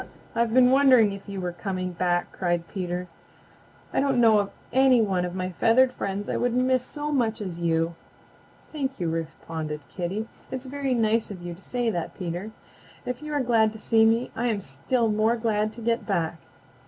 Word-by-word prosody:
"I've 235 -1 +1
been 250 +1 +6
wondering 260 -6 +6
if 200 0 -9
you 200 -1 -4
were 180 -1 -2
coming 185 0 -4
hack," 175 -1 +1
cried 175 -2 -1
Peter. 180 -2 -4 0.9
"I - - +2
don't 270 -2 +2
know 225 -3 +6
of 200 -1 -1 0.2
any 260 -1 +5
one 190 -5 +1
of 180 0 -5
my 185 0 -2
feathered 240 +7 +4
friends 200 -1 -3
I - - -1
would 245 -1 0
miss 255 0 +2
so 295 +2 -4
much 235 -6 +1
as 185 -5 -5
you." 165 0 +1 0.8
"Thank 275 -5 -3
you," 170 -2 -1
responded 160 -1 -4
Kitty. 195 +5 -3 0.2
"It's 260 0 -5
very 270 -1 -1
nice 225 -1 +1
of 185 -4 -8
you 175 0 -5
to 175 - -14
say 245 0 -1
that, 170 -5 -4
Peter. 180 +3 -4 0.6
If 250 +2 -4
you 300 0 -6
are 285 -2 +1
glad 225 -3 +3
to - - -9
see 225 0 +3
me 225 +2 +2
I 240 +2 0
am 220 -4 0
still 225 - -1
more 215 +2 +2
glad 215 -2 0
to 230 - -10
get 230 +1 0
back." 170 -5 0
215 Hz, 195 wpm, -26 LUFS, 180-245 Hz, 0.9 s, been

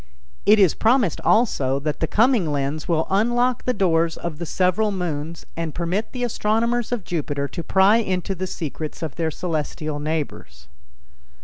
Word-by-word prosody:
It 215 - +7
is 190 -6 +5
promised 225 - +2
also 140 - +2
that 150 0 -2
the 160 - 0
coming 220 - +3
lens 145 +2 -2
will 160 -2 +1
unlock 240 +5 +1
the 255 - +2
doors 170 -6 +1
of 160 -3 -5
the 170 - -4
several 185 +6 +1
moons 165 -4 -4
and 165 -2 -4
permit 180 +6 -2
the 250 -1 -4
astronomers 235 +1 0
of 240 -5 -2
Jupiter 145 -5 -2
to 170 - -5
pry 190 +5 +4
into 190 -4 -1
the 185 0 -4
secrets 155 -2 -5
of 155 -4 -4
their 165 -1 0
celestial 155 -2 -3
neighbors. 145 - -4
175 Hz, 165 wpm, -22 LUFS, 155-215 Hz, -, It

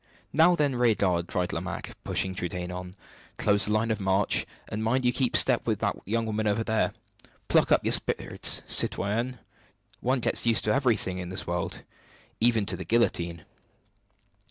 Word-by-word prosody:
"Now, 165 +4 +5
then, 145 -5 0
rear 120 -3 +3
guard," 90 -4 0
cried 90 -2 -2
Lomaque, - - -5
pushing 95 -1 -1
Trudaine 90 0 -4
on, 90 0 -8 0.4
"close 100 -1 +3
the - - -1
line 110 +1 0
of 110 - -2
march, 95 +1 +1 0.2
and 110 +1 -5
mind 125 +3 0
you 125 - +2
keep 130 -2 +1
step - - +4
with - - -1
your - - -2
young 115 +3 -1
woman 110 0 -2 0.2
there. 110 0 0 0.6
Pluck - - +3
up - - +3
your - - +1
spirits, - - +2
citoyenne! 115 +5 +1 0.6
one 130 +2 0
gets - - 0
used 115 -4 +5
to 105 - +1
everything 115 -9 0
in 90 -1 -6
this 90 - -4
world, 85 0 -4 0.6
even 115 -2 +2
to 90 - -1
the 95 - -7
guillotine!" 85 -5 -1
105 Hz, 170 wpm, -26 LUFS, 90-120 Hz, 0.6 s, Now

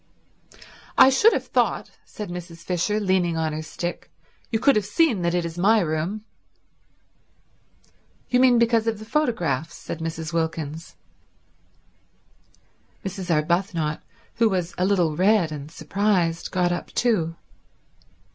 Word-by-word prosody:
"I 265 - +8
should 420 - +5
have - - -1
thought," - - 0
said 210 -5 -8
Mrs. 175 -1 -8
Fisher 185 +4 0
leaning 185 -4 +1
on 160 -1 -1
her 155 - -3
stick, 175 +2 -6 0.4
"you 225 - +1
could 275 +5 +4
have 210 - +2
seen 220 - +2
that 170 0 0
it 175 -1 0
is 170 +1 -6
my 215 +5 +4
room." 175 +5 -2 2.0
"You 250 - +2
mean 250 -1 +5
because 230 -1 +2
of 225 -1 0
the 215 - -10
photographs," 175 - -1
said 165 - -7
Mrs. 160 0 -5
Wilkins. 160 -1 -3 2.1
Mrs. 190 -1 -5
Arbuthnot, 165 -1 0 0.4
who 230 -1 +4
was 180 -3 -2
a 180 - 0
little 180 -6 +2
red 190 -2 +3
and 145 -1 -7
surprised, 170 0 0
got 180 -2 +1
up 175 - -3
too. 175 -9 0
180 Hz, 135 wpm, -24 LUFS, 165-215 Hz, 2.1 s, I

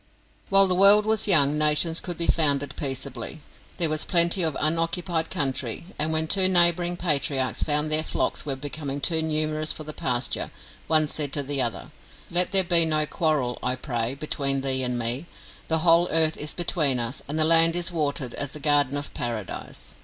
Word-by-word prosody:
While 195 0 +6
the 185 - 0
world 200 +3 +6
was 220 -1 +1
young, 150 -5 +5
nations 155 +2 +2
could 175 -3 -7
be 170 - 0
founded 145 -4 0
peaceably. 135 0 -5 0.4
There 170 -3 +1
was 155 0 -1
plenty 170 +1 +2
of 160 -4 -2
unoccupied 165 +1 -1
country, 135 -1 -3
and 155 +2 -1
when 160 0 0
two 190 +2 +4
neighbouring 175 -1 +3
patriarchs 140 -7 0
found 150 0 0
their 155 0 +4
flocks - - -3
were 140 -2 -3
becoming 145 0 -6
too 160 +3 0
numerous 155 0 -2
for 155 - -6
the 155 0 -8
pasture, 125 -3 -2 0.4
one 155 -1 +2
said 145 -1 -2
to 145 - +1
the 140 0 -2
other: 120 +4 -5 0.4
"Let 180 +1 +2
there 190 0 +3
be 170 -2 +3
no 155 -1 +1
quarrel, 150 -6 -2
I 125 0 0
pray, 125 -2 -4
between 140 -2 -2
thee 135 -1 -1
and 125 -1 -2
me; 120 +7 -3 0.4
the 160 - +1
whole 170 +1 +4
earth 160 0 +2
is 150 - -4
between 155 -6 +1
us, 120 +2 -3
and 150 +3 -4
the 155 - +2
land 165 +1 +4
is 175 +1 0
watered 145 -6 -3
as 145 -1 -3
the 150 - -9
garden 145 -1 +2
of 145 - -7
Paradise. 115 -5 -7
155 Hz, 190 wpm, -24 LUFS, 140-165 Hz, 0.4 s, While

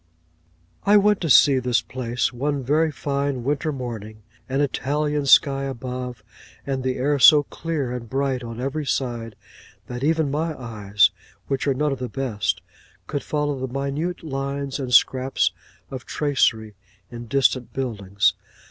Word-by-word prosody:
I 205 +1 +6
went 210 0 +3
to 165 - -1
see 135 -1 +6
this 125 -2 +1
place 120 -1 -2
one 140 +2 -2
very 155 +5 +2
fine 140 -3 -2
winter 145 +4 -1
morning: 110 -5 -7 0.3
an 135 +1 0
Italian 145 +1 -1
sky 135 0 +5
above, 125 -3 -5 0.4
and 135 -1 -2
the 130 0 -1
air 140 +3 0
so 145 +3 +8
clear 150 -4 -4
and 120 -2 -6
bright 135 -2 -1
on 115 0 -7
every 140 +4 -2
side, 120 -5 -2 0.5
that 125 +1 -6
even 160 -1 +1
my 155 +1 -2
eyes, 105 -4 +2 0.3
which 135 0 -2
are 135 - +2
none 150 +2 0
of 135 - -3
the 125 -1 -4
best, 125 -7 -2 0.4
could 145 - -3
follow 145 -2 -2
the 130 -1 -4
minute 140 +7 -3
lines 140 -1 -3
and 130 -2 -4
scraps 130 +2 +3 0.4
of 130 -2 -7
tracery 115 -7 +1 0.4
in 120 0 -8
distant 130 0 +1
buildings. 100 -7 0
135 Hz, 150 wpm, -23 LUFS, 125-145 Hz, 0.5 s, so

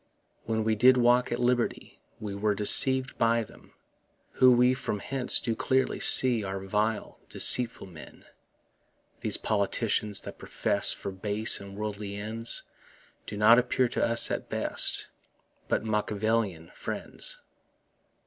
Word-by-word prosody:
When 110 -1 -2
we 110 0 0
did 125 +4 +4
walk 125 +1 +1
at 120 - -2
liberty 120 -1 -3 0.2
We 105 -2 -7
were 105 +1 -2
deceiv'd 130 +6 +4
by 115 0 +1
them, - - -19 0.6
Who 130 0 +4
we 125 +1 +3
from 130 -5 -5
hence 125 +5 0
do 115 -2 -4
clearly 130 +3 -1
see 125 -4 +4
Are 95 0 -6
vile, 105 +3 -4
deceitful 125 -1 +2
men. 85 -5 -15 0.9
These - - +1
politicians 105 0 -2
that - - -11
profess - - +1
For 100 - -5
base 105 +3 +1
and 100 0 -12
worldly 105 -1 -6
ends, 110 +3 +1 0.6
Do 105 - -7
not 110 +3 +5
appear 125 +1 -1
to - - -3
us 115 0 +3
at - - -5
best - - -2 0.6
But - - -2
Machiavellian 105 -4 -3
friends. - - 0
110 Hz, 135 wpm, -26 LUFS, 105-120 Hz, 0.9 s, not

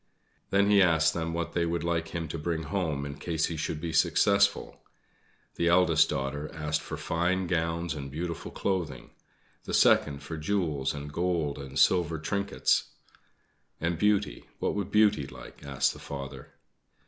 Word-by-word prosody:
Then 100 +1 +3
he 100 -1 +6
asked 80 -3 +4
them 85 -1 -2
what 85 0 -3
they 85 - +1
would 85 -1 -1
like 85 -1 -1
him 85 -1 -4
to 80 - -4
bring 80 +1 -2
them 75 - -8
home 80 -8 -1
in 70 0 -7
case 80 -2 0
he 85 - -4
should 75 0 -3
be 85 0 -4
successful. 100 +4 +2 0.8
The 85 - +1
eldest 90 +1 +4
daughter 70 +2 -3
asked 75 0 -1
for - - -6
fine 90 +3 0
gowns 85 -1 -1
and 70 -3 -6
beautiful 85 +2 -5
clothing; 85 -10 -3 0.5
the - - -1
second 70 -1 +4
for 80 +3 -6
jewels 75 -6 -1
and 75 0 -7
gold 85 -5 -1
and 70 0 -7
silver 85 +2 +3
trinkets. 100 +6 0 0.9
"And 85 0 -1
Beauty 105 0 +1
what - - -1
would 100 -2 -3
Beauty 105 -8 +3
like?" - - -12
asked 70 -1 0
the - - -12
father. 70 -1 -8
85 Hz, 165 wpm, -28 LUFS, 75-90 Hz, 0.9 s, he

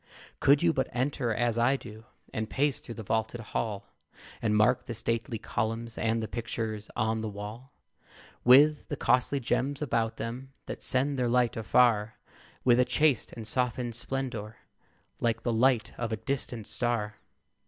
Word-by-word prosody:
Could 140 +3 +5
you 170 -1 +4
but 130 -2 -1
enter 125 -1 -1
as 120 +1 +1
I 125 +4 +4
do, 110 -4 -10 0.3
And 110 0 -3
pace 145 0 +1
through 115 - -8
the 110 - -7
vaulted 110 +3 -1
hall, 105 -2 -3 0.6
And 105 -2 +2
mark 120 +4 +3
the 120 - -4
stately 115 +2 -1
columns, 115 +1 -3
And 115 0 0
the - - -3
pictures 110 -2 -4
on 110 0 0
the 110 - -3
wall; 105 +6 -8 0.7
With 145 +4 +6
the - - -3
costly 130 +3 +2
gems 135 +3 -1
about 115 -6 0
them, 130 +4 -6
That - - -6
send 135 +1 0
their 125 -1 +1
light 120 -1 +2
afar, 110 -1 +3 0.5
With 120 -1 +5
a - - +7
chaste 150 -5 +2
and 115 - -7
softened 120 +1 -1
splendor 115 -3 -4 0.6
Like 115 -1 0
the 120 - 0
light 120 0 +2
of 120 -2 -2
a 110 - -1
distant 120 -2 -3
star! 115 -3 -1
120 Hz, 165 wpm, -29 LUFS, 110-130 Hz, 0.7 s, a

